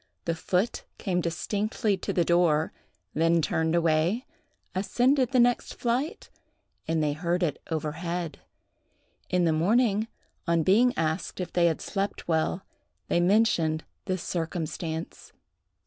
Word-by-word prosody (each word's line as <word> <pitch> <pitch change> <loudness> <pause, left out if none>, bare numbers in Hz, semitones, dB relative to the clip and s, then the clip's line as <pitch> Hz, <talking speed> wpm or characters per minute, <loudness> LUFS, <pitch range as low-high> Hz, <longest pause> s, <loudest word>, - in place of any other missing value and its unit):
The 165 - +1
foot 180 +6 -1
came 180 -3 -1
distinctly 205 +5 -1
to 190 - -4
the 175 - +2
door, 165 -3 +3 0.4
then 165 +2 +3
turned 160 +1 +1
away, 170 +8 +2 0.5
ascended 250 +7 +2
the 255 - +3
next 245 0 +2
flight, 250 +5 -2 0.6
and 160 -1 +1
they 150 -1 +1
heard 175 +3 -1
it 150 -5 -1
overhead. 165 +2 -3 0.9
In 180 -1 +2
the 160 - +3
morning, 215 +6 +2 0.4
on 170 -1 +3
being 225 +9 +5
asked 160 +4 -1
if 180 -2 -4
they 175 -1 +4
had 160 - 0
slept 200 0 -3
well, 165 +3 0 0.4
they - - +3
mentioned 175 -5 +3 0.2
this 185 -3 -2
circumstance. 165 -1 -4
175 Hz, 130 wpm, -27 LUFS, 160-200 Hz, 0.9 s, being